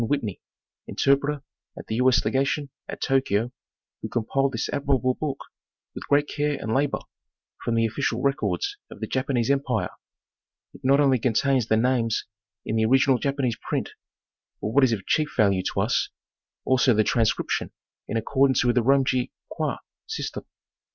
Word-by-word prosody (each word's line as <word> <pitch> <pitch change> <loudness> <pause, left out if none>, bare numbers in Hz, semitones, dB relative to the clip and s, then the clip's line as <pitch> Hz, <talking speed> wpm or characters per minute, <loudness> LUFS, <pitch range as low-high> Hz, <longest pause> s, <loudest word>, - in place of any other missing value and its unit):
Whitney, 115 -5 -2 0.5
interpreter 140 +1 +1 0.3
at - - -8
the - - -4
U. 125 +1 +3
8. 125 - +2
Legation 135 +1 0 0.2
at - - -6
Tokyo, 125 -4 +1 0.5
who - - -5
com 115 -2 -1
piled 135 +2 +1
this 115 - -1
admirable 135 -3 +1
book 140 0 -3 0.6
with - - -8
great 145 +1 +3
care 145 -1 -1
and 110 0 -3
labor 140 +1 +1 0.6
from 115 -1 0
the 115 0 +3
official 115 +1 -1
records 155 - 0
of - - -11
the - - -2
Japanese 130 -2 0
empire. 140 0 0 0.8
It - - -14
not 135 +2 +4
only 135 -3 +4
contains 125 +1 +2
the 110 - +3
names 115 -2 +1 0.4
in 110 - -1
the 110 - +3
original 130 +1 +4
Japanese 135 -4 -1
print, - - -1 0.7
but 105 - -3
what 135 +5 +4
is 130 - +4
of 100 -4 -2
chief 155 -2 0
value 100 -3 +3
to - - 0
us, - - +1 0.6
also 130 -2 +4
the 110 - +4
transcription, 115 0 0 0.4
in 115 - -2
accordance 130 +2 +2
with 120 0 +2
the - - +5
Romaji 130 -1 +2 0.2
Kwai - - -2 0.3
system. - - -5
130 Hz, 165 wpm, -25 LUFS, 115-140 Hz, 0.8 s, the